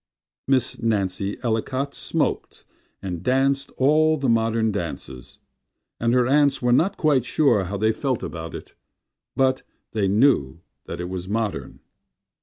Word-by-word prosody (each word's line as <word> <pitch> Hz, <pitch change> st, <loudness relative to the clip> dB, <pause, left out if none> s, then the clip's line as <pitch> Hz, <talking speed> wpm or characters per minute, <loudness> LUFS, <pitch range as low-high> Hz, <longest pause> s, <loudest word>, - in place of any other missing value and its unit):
Miss 130 Hz, -3 st, 0 dB
Nancy 100 Hz, -3 st, -1 dB
Ellicott 130 Hz, +4 st, -1 dB
smoked -, -, -2 dB, 0.4 s
And 90 Hz, -3 st, -4 dB
danced 135 Hz, +4 st, +1 dB
all 155 Hz, +3 st, +4 dB
the 135 Hz, -3 st, -1 dB
modern 115 Hz, -1 st, +2 dB
dances; 80 Hz, -9 st, -6 dB, 0.6 s
And 115 Hz, 0 st, +1 dB
her 125 Hz, -1 st, +4 dB
aunts 140 Hz, +1 st, +3 dB
were 125 Hz, -1 st, +1 dB
not 185 Hz, +10 st, +2 dB
quite 145 Hz, -6 st, +2 dB
sure 125 Hz, -8 st, +2 dB
how 100 Hz, +3 st, -4 dB
they 110 Hz, +2 st, +2 dB
felt 130 Hz, +1 st, -2 dB
about 80 Hz, -1 st, -6 dB
it, -, -, -10 dB, 0.6 s
But 130 Hz, -1 st, +2 dB, 0.3 s
they 105 Hz, -3 st, 0 dB
knew 95 Hz, -, +2 dB, 0.3 s
that -, -, -6 dB
it 90 Hz, -, -3 dB
was 90 Hz, -1 st, -5 dB
modern. 110 Hz, 0 st, -3 dB
115 Hz, 140 wpm, -23 LUFS, 100-135 Hz, 0.6 s, all